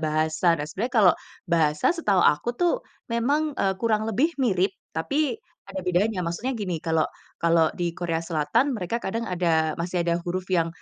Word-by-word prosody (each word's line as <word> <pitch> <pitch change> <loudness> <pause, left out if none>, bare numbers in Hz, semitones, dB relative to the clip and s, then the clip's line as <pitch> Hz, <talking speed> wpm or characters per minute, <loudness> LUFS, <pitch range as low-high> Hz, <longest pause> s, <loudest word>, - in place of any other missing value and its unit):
bahasa, 155 +2 +2
dan 145 - -3
sebenarnya 225 +10 -3
kalau 180 - +8 0.3
bahasa 160 - +2
setahu 210 - +1
aku 150 - +3
tuh 350 -1 +2 0.4
memang, 285 +6 +1
eee, 195 -6 0
kurang 220 0 0
lebih 275 - +1
mirip 195 -6 +2 0.2
tapi 275 - 0 0.3
ada 195 -1 -4
bedanya. 180 +2 +1
Maksudnya 230 +10 -2
gini, 185 -7 -3
kalau 160 -1 +1 0.3
kalau 165 -1 +3
di 175 -1 -1
Korea 165 -1 -2
Selatan 165 - +1
mereka 215 -1 -2
kadang 230 +4 -2
ada 165 -3 +1
masih 175 +1 -2
ada 170 0 +1
huruf 180 +1 -2
yang, 170 -3 +2
180 Hz, 165 wpm, -25 LUFS, 165-225 Hz, 0.4 s, kalau